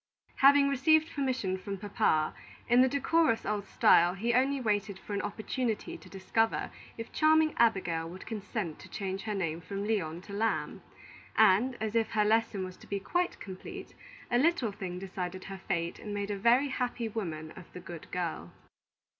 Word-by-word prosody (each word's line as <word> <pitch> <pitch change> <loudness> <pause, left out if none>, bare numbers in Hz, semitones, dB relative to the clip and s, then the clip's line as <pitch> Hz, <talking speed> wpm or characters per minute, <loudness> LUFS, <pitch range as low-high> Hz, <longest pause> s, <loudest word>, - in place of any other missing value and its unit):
Having 280 +1 +6
received 315 +4 +3
permission 255 -10 -1
from 195 +1 -5
Papa, 170 -6 +1 0.3
in 240 +1 +6
the 260 - +5
decorous 285 -1 +2
old 205 -1 -2
style, 175 +2 +5
he 230 +5 0
only 270 +3 +2
waited 205 -4 -1
for 205 - -8
an 200 - 0
opportunity 225 +2 -3
to - - -13
discover 225 +4 0 0.3
if 230 0 -7
charming 310 0 +4
Abigail 175 -8 +2
would 185 +2 -10
consent 205 -6 -4
to - - -12
change 195 -1 -4
her 210 -1 -2
name 165 -3 -2
from 200 +3 -5
Lyon 175 -7 -1
to 200 - -11
Lamb; 220 +2 -1 0.5
and, 220 +4 +4
as 220 -1 -2
if 230 -1 +1
her 210 -2 +3
lesson 220 -3 +1
was 185 0 -9
to - - -16
be 200 - -2
quite 355 - -1
complete, 190 -2 -8 0.4
a 240 - +4
little 285 -6 +2
thing 190 -3 -6
decided 185 -1 -5
her 195 -1 -8
fate 170 -2 -1
and 210 -1 -6
made 200 0 -2
a - - -1
very 245 +6 +4
happy 245 -3 -2
woman 165 -8 -5
of 180 +1 -13
the - - -7
good 175 -2 -10
girl. 165 - -3
205 Hz, 180 wpm, -30 LUFS, 185-240 Hz, 0.5 s, Having